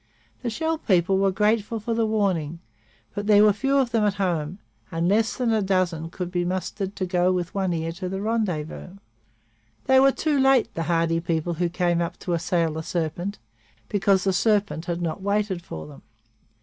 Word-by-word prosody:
The 245 Hz, -, -2 dB
Shell 320 Hz, +7 st, -1 dB
people 190 Hz, -, +2 dB
were 195 Hz, 0 st, +3 dB
grateful 210 Hz, +3 st, +1 dB
for 230 Hz, +2 st, -2 dB
the 225 Hz, -1 st, +1 dB
warning, 185 Hz, -8 st, 0 dB, 0.6 s
but 205 Hz, 0 st, -4 dB
there 210 Hz, -1 st, +7 dB
were 210 Hz, -1 st, +6 dB
few 270 Hz, +7 st, +1 dB
of 260 Hz, -3 st, +2 dB
them 225 Hz, -2 st, +2 dB
at 205 Hz, -2 st, +1 dB
home, 175 Hz, -4 st, -1 dB, 0.3 s
and 165 Hz, 0 st, 0 dB
less 215 Hz, +4 st, +2 dB
than 245 Hz, -3 st, +1 dB
a 220 Hz, -, +2 dB
dozen 185 Hz, -4 st, 0 dB
could 180 Hz, +1 st, -5 dB
be 175 Hz, -1 st, 0 dB
mustered 185 Hz, +2 st, -3 dB
to 185 Hz, -, -2 dB
go 180 Hz, 0 st, +2 dB
with 180 Hz, -1 st, -2 dB
One 190 Hz, -2 st, 0 dB
Ear 165 Hz, -1 st, -2 dB
to 180 Hz, +2 st, -5 dB
the 190 Hz, +1 st, -3 dB
rendezvous. 195 Hz, -5 st, -3 dB, 0.9 s
They 265 Hz, 0 st, +5 dB
were 270 Hz, +1 st, +6 dB
too 295 Hz, 0 st, 0 dB
late, 270 Hz, -2 st, +3 dB
the 165 Hz, -, -3 dB
hardy 165 Hz, -1 st, +2 dB
people 165 Hz, 0 st, -1 dB
who 175 Hz, +1 st, -1 dB
came 175 Hz, -1 st, +1 dB
up 170 Hz, -, -3 dB
to 175 Hz, -, -2 dB
assail 170 Hz, -1 st, 0 dB
the 160 Hz, -, -4 dB
serpent, 175 Hz, +4 st, -3 dB, 0.5 s
because 195 Hz, -2 st, +2 dB
the 195 Hz, -, +1 dB
serpent 200 Hz, -3 st, +1 dB
had 175 Hz, 0 st, -3 dB
not 170 Hz, +3 st, -3 dB
waited 200 Hz, -2 st, 0 dB
for 80 Hz, -, -8 dB
them. 145 Hz, -2 st, -13 dB
185 Hz, 195 wpm, -24 LUFS, 170-210 Hz, 0.9 s, there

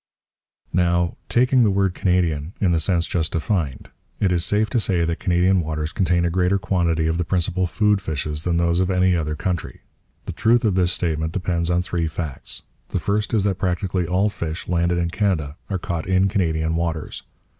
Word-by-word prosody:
Now, 85 Hz, -1 st, +2 dB
taking 125 Hz, +1 st, +3 dB
the 110 Hz, -, +4 dB
word 95 Hz, -1 st, +1 dB
Canadian 85 Hz, -4 st, 0 dB
in 95 Hz, -4 st, +2 dB
the 85 Hz, -, +2 dB
sense 85 Hz, 0 st, +1 dB
just 80 Hz, -2 st, -1 dB
defined, 80 Hz, -, -2 dB, 0.3 s
it 95 Hz, -, +2 dB
is 85 Hz, -2 st, +1 dB
safe 105 Hz, +3 st, +1 dB
to 120 Hz, -, +2 dB
say 90 Hz, -5 st, +1 dB
that 85 Hz, 0 st, -2 dB
Canadian 90 Hz, 0 st, +2 dB
waters 75 Hz, 0 st, -3 dB
contain 85 Hz, -2 st, +1 dB
a 85 Hz, -, 0 dB
greater 90 Hz, +2 st, +2 dB
quantity 85 Hz, -4 st, 0 dB
of 80 Hz, +1 st, 0 dB
the -, -, +2 dB
principal 90 Hz, +1 st, 0 dB
food 105 Hz, +3 st, +2 dB
fishes 75 Hz, -2 st, -3 dB
than 85 Hz, +1 st, 0 dB
those 85 Hz, 0 st, +2 dB
of 95 Hz, 0 st, +1 dB
any 90 Hz, -1 st, +3 dB
other 75 Hz, -2 st, -1 dB
country. 90 Hz, 0 st, -3 dB, 0.4 s
The -, -, -4 dB
truth 115 Hz, +1 st, +3 dB
of 105 Hz, -, +3 dB
this 90 Hz, -1 st, +2 dB
statement 80 Hz, -3 st, -1 dB
depends 85 Hz, -3 st, -1 dB
on 90 Hz, 0 st, +2 dB
three 85 Hz, -2 st, -1 dB
facts. 80 Hz, -3 st, -5 dB, 0.2 s
The -, -, -3 dB
first 105 Hz, 0 st, -1 dB
is 110 Hz, -4 st, +2 dB
that 100 Hz, -2 st, 0 dB
practically 90 Hz, -1 st, -1 dB
all 95 Hz, +4 st, +2 dB
fish 85 Hz, -4 st, -5 dB
landed 85 Hz, 0 st, +1 dB
in 85 Hz, -1 st, -1 dB
Canada 85 Hz, -9 st, -1 dB
are 95 Hz, -, -1 dB
caught 85 Hz, -2 st, -4 dB
in 95 Hz, +1 st, +3 dB
Canadian 80 Hz, -5 st, 0 dB
waters. 80 Hz, -2 st, -3 dB
90 Hz, 195 wpm, -22 LUFS, 85-95 Hz, 0.4 s, the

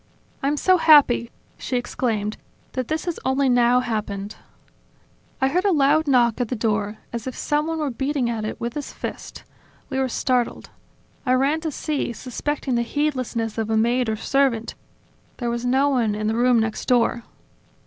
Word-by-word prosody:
"I'm 285 Hz, +2 st, 0 dB
so 370 Hz, +4 st, +4 dB
happy," 280 Hz, -7 st, +6 dB, 0.3 s
she 255 Hz, -, -2 dB
exclaimed, 220 Hz, -4 st, -2 dB, 0.3 s
"that 255 Hz, -2 st, -3 dB
this 315 Hz, +2 st, -2 dB
has 345 Hz, -2 st, -3 dB
only 265 Hz, +1 st, +2 dB
now 245 Hz, 0 st, +4 dB
happened!" 210 Hz, -4 st, -4 dB, 1.0 s
I 265 Hz, -, +3 dB
heard 360 Hz, +6 st, +1 dB
a 405 Hz, -, +3 dB
loud 300 Hz, 0 st, +3 dB
knock 245 Hz, -3 st, +3 dB
at 245 Hz, -, 0 dB
the 250 Hz, -, -3 dB
door, 215 Hz, -2 st, -1 dB, 0.2 s
as 235 Hz, +1 st, -4 dB
if 255 Hz, -, -5 dB
someone 305 Hz, +2 st, -1 dB
were 300 Hz, -3 st, -1 dB
beating 270 Hz, +1 st, -1 dB
at 230 Hz, -2 st, -2 dB
it 215 Hz, -, -4 dB
with 235 Hz, 0 st, -3 dB
his 295 Hz, -, -5 dB
fist. -, -, -7 dB, 0.5 s
We 265 Hz, -, -1 dB
were 265 Hz, -1 st, 0 dB
startled. 250 Hz, 0 st, -1 dB, 0.5 s
I 255 Hz, -, +2 dB
ran 275 Hz, +5 st, +2 dB
to 320 Hz, -, -2 dB
see, 290 Hz, -4 st, -2 dB
suspecting 260 Hz, +3 st, -3 dB
the 235 Hz, -, +2 dB
heedlessness 240 Hz, -5 st, -2 dB
of 220 Hz, -1 st, -2 dB
a 220 Hz, -, +2 dB
maid 240 Hz, +2 st, +2 dB
or 220 Hz, -, 0 dB
servant; 245 Hz, -1 st, 0 dB, 0.6 s
there 240 Hz, -2 st, -2 dB
was 235 Hz, +1 st, -3 dB
no 265 Hz, +3 st, +3 dB
one 235 Hz, -6 st, +1 dB
in 215 Hz, 0 st, -3 dB
the 220 Hz, -, +1 dB
room 245 Hz, 0 st, +4 dB
next 220 Hz, -1 st, -2 dB
door." 240 Hz, -1 st, +2 dB
250 Hz, 180 wpm, -23 LUFS, 230-280 Hz, 1.0 s, happy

